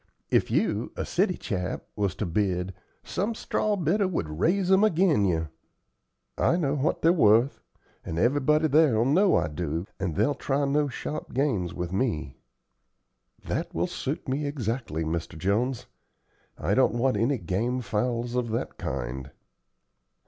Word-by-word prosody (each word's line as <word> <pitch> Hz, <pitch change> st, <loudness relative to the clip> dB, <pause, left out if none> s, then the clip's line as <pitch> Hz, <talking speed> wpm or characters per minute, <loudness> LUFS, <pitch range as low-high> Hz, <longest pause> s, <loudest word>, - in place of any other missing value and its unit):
If -, -, +3 dB
you, -, -, 0 dB
a -, -, -3 dB
city -, -, +1 dB
chap, 90 Hz, 0 st, -3 dB
was 100 Hz, -3 st, -1 dB
to 105 Hz, -, -2 dB
bid, 90 Hz, 0 st, -1 dB, 0.3 s
some 215 Hz, +4 st, -2 dB
straw 215 Hz, -1 st, 0 dB
bidder 190 Hz, +3 st, +1 dB
would 80 Hz, -, -3 dB
raise 185 Hz, -, +2 dB
'em 190 Hz, +2 st, +6 dB
agin 170 Hz, -, +3 dB
you. 80 Hz, -4 st, 0 dB, 0.9 s
I -, -, +3 dB
know 145 Hz, -6 st, 0 dB
what 145 Hz, +1 st, 0 dB
they're 165 Hz, +1 st, +6 dB
wuth, 115 Hz, -, +4 dB, 0.4 s
and 80 Hz, -, -5 dB
everybody 145 Hz, -, +3 dB
there'll 140 Hz, -7 st, +4 dB
know 185 Hz, +9 st, +4 dB
I 85 Hz, -, +2 dB
do, 80 Hz, +2 st, -3 dB
and 90 Hz, -5 st, -2 dB
they'll 145 Hz, -, +2 dB
try 140 Hz, 0 st, -1 dB
no 145 Hz, +1 st, +2 dB
sharp 145 Hz, +1 st, -6 dB
games 115 Hz, -, 0 dB
with 90 Hz, 0 st, -4 dB
me." 80 Hz, -, -1 dB, 1.1 s
"That -, -, -3 dB
will -, -, +1 dB
suit -, -, -4 dB
me 140 Hz, +3 st, -1 dB
exactly, 115 Hz, -, -2 dB
Mr. 80 Hz, 0 st, -3 dB
Jones. 110 Hz, +8 st, 0 dB, 0.7 s
I 90 Hz, +6 st, 0 dB
don't 130 Hz, -1 st, +3 dB
want 130 Hz, 0 st, +2 dB
any 120 Hz, +7 st, +1 dB
game 120 Hz, +6 st, -1 dB
fowls 120 Hz, +2 st, -1 dB
of 125 Hz, -2 st, -1 dB
that 110 Hz, -, -3 dB
kind." 65 Hz, +1 st, -4 dB
120 Hz, 150 wpm, -27 LUFS, 90-145 Hz, 1.1 s, em